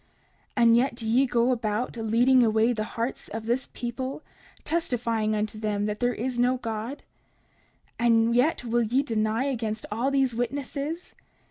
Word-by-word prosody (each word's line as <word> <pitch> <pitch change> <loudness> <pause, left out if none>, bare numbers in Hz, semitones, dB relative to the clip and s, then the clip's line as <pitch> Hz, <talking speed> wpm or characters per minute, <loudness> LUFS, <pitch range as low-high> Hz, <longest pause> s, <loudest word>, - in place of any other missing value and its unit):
30:45 240 - +4
And 230 0 +6
yet 250 0 +1
do 230 -2 -5
ye 255 +5 +3
go 240 +1 +2
about, 225 0 -1
leading 235 +3 +3
away 220 +1 +3
the 215 -2 -2
hearts 230 +3 -3
of 220 +1 -6
this 240 +3 -1
people, 255 +4 -5 0.4
testifying 235 -9 0
unto 215 0 -2
them 210 -1 -1
there 215 +4 0
is 245 +2 -3
no 250 +1 +3
God? 230 +3 -5 1.0
And 230 -1 +4
yet 255 +3 +2
will 240 0 +1
ye 240 +5 +1
deny 220 -1 0
against 225 -5 -2
all 235 +6 0
these 270 -3 +2
witnesses? 280 +7 -4
235 Hz, 155 wpm, -26 LUFS, 220-255 Hz, 1.0 s, And